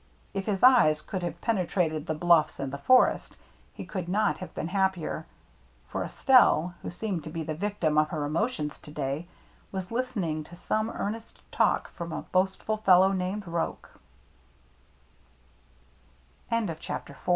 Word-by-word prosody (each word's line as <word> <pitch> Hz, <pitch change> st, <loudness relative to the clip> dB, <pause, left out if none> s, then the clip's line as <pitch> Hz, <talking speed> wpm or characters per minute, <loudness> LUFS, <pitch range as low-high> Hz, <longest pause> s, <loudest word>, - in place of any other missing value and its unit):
If 195 Hz, 0 st, -3 dB
his 200 Hz, -1 st, -1 dB
eyes 240 Hz, -13 st, +6 dB
could 185 Hz, +4 st, -5 dB
have 170 Hz, -2 st, -4 dB
penetrated 175 Hz, -7 st, 0 dB
the 155 Hz, -, -1 dB
bluffs 170 Hz, -1 st, +3 dB
and 135 Hz, -1 st, -4 dB
the 140 Hz, -, -4 dB
forest, 255 Hz, -, +4 dB, 0.4 s
he -, -, -9 dB
would 180 Hz, -3 st, -3 dB
not 210 Hz, +2 st, +2 dB
have 185 Hz, -, -7 dB
been 160 Hz, -, -3 dB
happier. 190 Hz, -3 st, -1 dB, 0.6 s
For -, -, -2 dB
Es -, -, -11 dB
telle, 205 Hz, -, +6 dB
who -, -, -5 dB
seemed 180 Hz, -2 st, -3 dB
to 155 Hz, -, -7 dB
be 165 Hz, 0 st, -4 dB
the 155 Hz, 0 st, -3 dB
victim 165 Hz, -3 st, 0 dB
of 155 Hz, 0 st, +2 dB
her 150 Hz, -3 st, -2 dB
emotions 155 Hz, 0 st, -2 dB
to -, -, -13 dB
day, 150 Hz, +2 st, -3 dB, 0.4 s
was 190 Hz, 0 st, -5 dB
listening 210 Hz, -11 st, -2 dB
to 175 Hz, -, -12 dB
some 215 Hz, +5 st, -1 dB
earnest 225 Hz, +1 st, -5 dB
talk -, -, +1 dB
from 170 Hz, -1 st, -6 dB
a -, -, -4 dB
boastful 190 Hz, +3 st, +1 dB
fellow 190 Hz, -2 st, +5 dB
named 190 Hz, +2 st, -2 dB
180 Hz, 145 wpm, -28 LUFS, 155-205 Hz, 0.6 s, eyes